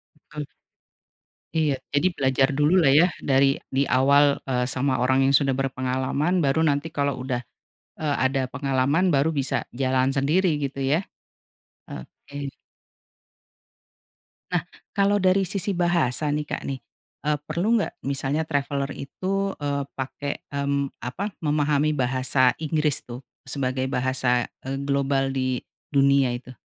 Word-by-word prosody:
Betul. 150 0 -8 1.1
Iya. 155 -3 +2 0.2
Jadi 145 +5 +3
belajar 135 0 +2
dululah 150 +2 +4
ya 175 - +6
dari, 135 0 +3
di 135 +1 +1
awal, 140 +2 +4
eee, 125 -1 +1
sama 130 -1 0
orang 130 +1 +3
yang 135 - +2
sudah 140 -1 +3
berpengalaman 130 +5 0
baru 155 +1 +2
nanti 145 0 +1
kalau 140 -1 0
udah, 125 -1 -3 0.6
eee, 150 -2 0
ada 135 +1 +1
pengalaman 140 +7 +1
baru 140 +2 +3
bisa 135 -1 0 0.2
jalan 130 0 +2
sendiri 155 +5 +2
gitu, 140 0 -4
ya? 145 +7 +1 0.9
Oke. 140 - -8 2.0
Nah, 175 -1 -1 0.2
kalau 200 0 +2
dari 190 -1 +3
sisi 200 +1 -1
bahasa 170 -7 +1
nih 150 +1 0
Kak 150 - -5
nih, 135 -1 -3 0.4
eee, 150 0 +1
perlu 195 +9 +1
enggak - - -3
misalnya 140 +3 -1
traveller 140 -2 -2
itu, 195 +8 -3
eee, 140 -1 -2
pakai, 140 +2 -5
mmm, 140 -1 -1
apa, 185 - -4
memahami 150 0 +1
bahasa 130 0 +3
Inggris 155 -2 +1
tuh 125 +2 -8 0.2
sebagai 130 -1 -1
bahasa, 125 -1 +1 0.2
eee, 135 - -2
global 140 -1 +1
di 130 -2 -1 0.3
dunia 140 -2 +4
itu? 125 +1 -9
140 Hz, 130 wpm, -24 LUFS, 130-155 Hz, 2.0 s, ya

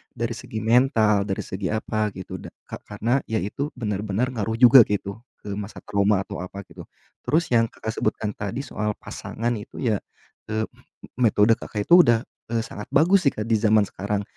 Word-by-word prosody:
dari 115 0 -2
segi 110 -1 -6
mental, 110 -4 +3
dari 95 - -2
segi 95 0 -4
apa 110 0 -1
gitu, 95 - -7
da - - -9 0.2
ka - - -8
karena 120 +5 0
ya 110 -3 -1
itu 140 +9 -4
benar-benar 105 +1 -2
ngaruh 110 -2 -2
juga 120 0 +8
gitu, 100 0 -3 0.2
eee, 105 - -6
masa 105 +1 -8
trauma 100 -1 +1
atau - - -7
apa 95 +2 -7
gitu. - - -13 0.4
Terus 165 0 +1
yang 115 -1 +4
Kakak 110 0 -6
sebutkan 110 -1 -1
tadi 105 +7 -5
soal 105 -6 -3
pasangan 120 +2 -4
itu 105 - -9
ya, 110 -5 +1 0.5
eee, 110 0 -1 0.6
metode 115 -2 +4
Kakak 105 -1 -4
itu 175 - +8
udah, 115 -3 +3 0.3
eee, 115 -1 0
sangat 105 -2 -8
bagus 175 +3 +4
sih, - - +5
Kak, 105 - -2
di 115 - +3
zaman 110 -1 +4
sekarang. 100 +1 -3
110 Hz, 185 wpm, -24 LUFS, 105-120 Hz, 0.6 s, juga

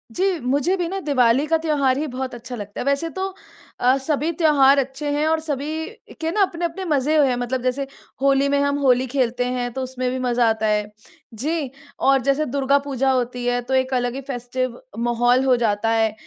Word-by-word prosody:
जी, 370 -2 +1
मुझे 280 +8 +1
भी 350 -2 -1
ना 390 +1 -3
दिवाली 265 -3 +2
का 325 +1 +3
त्यौहार 280 -4 +2
ही 300 - -1
बहुत 255 -1 -4
अच्छा 245 +1 -8
लगता 205 -2 -7
है। - - -4
वैसे 280 +4 0
तो 380 +2 -4 0.5
अ, 255 +2 +4
सभी 300 +3 -1
त्यौहार 285 -4 +5
अच्छे 270 +2 -3
हैं 295 +1 0
और 320 0 +2
सभी 310 +1 -3 0.4
के 325 +1 -1
ना 415 - +1
अपने-अपने 345 0 -1
मज़े 295 -2 +1
हैं, 250 - +1
मतलब 245 +1 -2
जैसे 255 +2 -1 0.4
होली 275 0 +3
में 280 0 +2
हम 285 0 +1
होली 255 -2 +3
खेलते 245 -1 0
हैं 245 0 -2
तो 265 - -4
उसमें 255 -1 -3
भी 260 - -2
मज़ा 245 -2 +2
आता 220 0 -1
है। 210 0 +2 0.5
जी, 290 +5 -2 0.3
और 270 -1 +3
जैसे 275 +4 +1
दुर्गा 275 +1 +2
पूजा 270 -1 +1
होती 250 -1 -1
है 245 0 +1
तो 250 +2 -5
एक 260 0 +1
अलग 245 -1 0
ही 275 - -4
फेस्टिव 250 0 -3 0.2
माहौल 240 +2 +2
हो 255 - +4
जाता 220 -1 0
है। 225 -1 +2
265 Hz, 205 wpm, -22 LUFS, 245-295 Hz, 0.5 s, त्यौहार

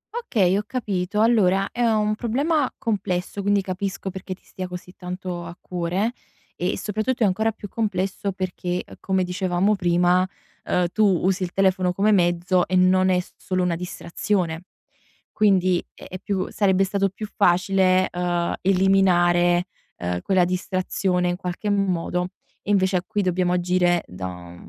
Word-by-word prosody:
Okay, 210 - +1
ho 205 - +1
capito. 205 -4 -1
Allora, 195 -4 +3
è 240 - -4
un 215 -2 +2
problema 270 +6 0
complesso, 195 -3 -2
quindi 200 0 +2
capisco 190 0 -4
perché 190 0 -6
ti - - -33
stia 185 -1 -6
così 180 0 -9
tanto 180 -1 -5
a 170 +1 -9
cuore, 180 +5 -2 0.4
e - - -1
soprattutto 220 +3 -1
è - - +6
ancora 220 +4 +1
più 205 -1 -9
complesso 195 -2 -2
perché, 180 -1 -3
uhm, - - -13
come 190 -1 0
dicevamo 185 +2 +1
prima, 175 -1 +3 0.5
uhm, 180 0 +1
tu 215 - +2 0.2
usi 190 0 +1
il 180 -1 -2
telefono 185 -1 +2
come 205 +3 +2
mezzo 175 -1 +2
e 185 - -1
non 185 +1 +4
è 180 -1 +3
s 180 - -8
solo 185 -1 -1
una 175 -1 +1
distrazione. 175 0 -2 0.7
Quindi, 185 -4 +3
è - - -12
è 185 - -7
più 195 -2 -2
sarebbe 195 -2 +2
stato 195 0 0
più 210 +3 -7
facile, 185 0 +3
uhm, 175 -1 -1
eliminare, 180 -2 +3 0.3
uhm, 90 0 -3
quella 185 -2 +3
distrazione 185 0 -1
in 175 - -2
qualche 180 +3 -3
modo. 180 -3 0 0.3
E - - -9
invece, 190 -2 +3
a 180 - -2
qui 210 -2 -1
dobbiamo 180 0 +1
agire 180 -1 +2
da 90 -1 -8
185 Hz, 160 wpm, -23 LUFS, 180-200 Hz, 0.7 s, è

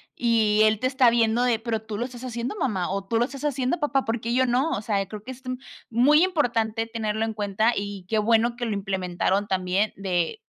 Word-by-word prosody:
Y, 220 -3 +2
él 215 -1 +3
te 255 - +1
está 260 -2 +4
viendo 230 0 +2
de: 240 -3 +2
"Pero 225 -1 -2
tú 220 -1 -6
lo 240 - -1
estás 250 -1 -9
haciendo 245 - -4
mamá". 210 - -1
O: 195 +1 -2
"Tú 225 +3 0
lo 235 - +3
estás 275 +2 -9
haciendo 280 +2 0
papá, 285 -3 0
¿por 225 +1 -1
qué 230 +1 -2
yo 260 +1 +3
no?". 255 +6 +1
O 220 -5 -1
sea, 200 -2 -1
creo 210 +2 -8
que 260 - -7
es 260 - -11
t 255 - -6 0.4
muy 280 +8 +5
importante 230 -10 0
tenerlo 220 -1 -2
en 225 - -3
cuenta, 215 +2 +1
y 200 -2 -5
qué 220 - 0
bueno 230 +2 +2
que 240 0 -3
lo 225 - -1
implementaron 195 0 -1
también 190 +2 0
de, 190 - -2
225 Hz, 235 wpm, -25 LUFS, 205-250 Hz, 0.4 s, muy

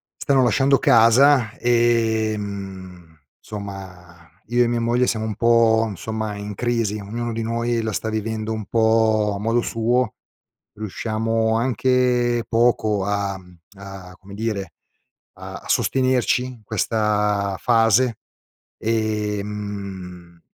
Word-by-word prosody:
stanno 135 -2 +2
lasciando 135 +3 +3
casa, 120 0 +5
ehm, 105 -7 -1 0.2
somma 95 -4 -9 0.2
io 120 +1 +3
e - - +1
mia 120 0 0
moglie 120 +2 +2
siamo 110 -2 -1
un 110 -2 -4
po', 115 0 +3
insomma, 110 +2 -4
in 100 0 -6
crisi 115 -3 -1
ognuno 115 +3 -4
di 115 - -3
noi 115 +1 -1
la 110 0 -2
sta 110 +2 -3
vivendo 110 0 -3
un 110 -1 -5
po' 110 -1 +2
a - - -5
modo 115 +3 +1
suo, 115 +1 0 0.6
riusciamo 110 +2 -1
anche 125 -1 +1
poco 110 -4 +2
a 100 -1 -2
mhmm, 90 -1 -18 0.2
a 95 -2 -10
come 100 +1 -13
dire, 100 -4 -3 0.7
a - - -9
sostenerci, 130 -2 +1
questa 105 -1 0
fase. 115 0 +3 0.6
Ehm, 100 -5 -4
110 Hz, 115 wpm, -21 LUFS, 100-115 Hz, 0.7 s, casa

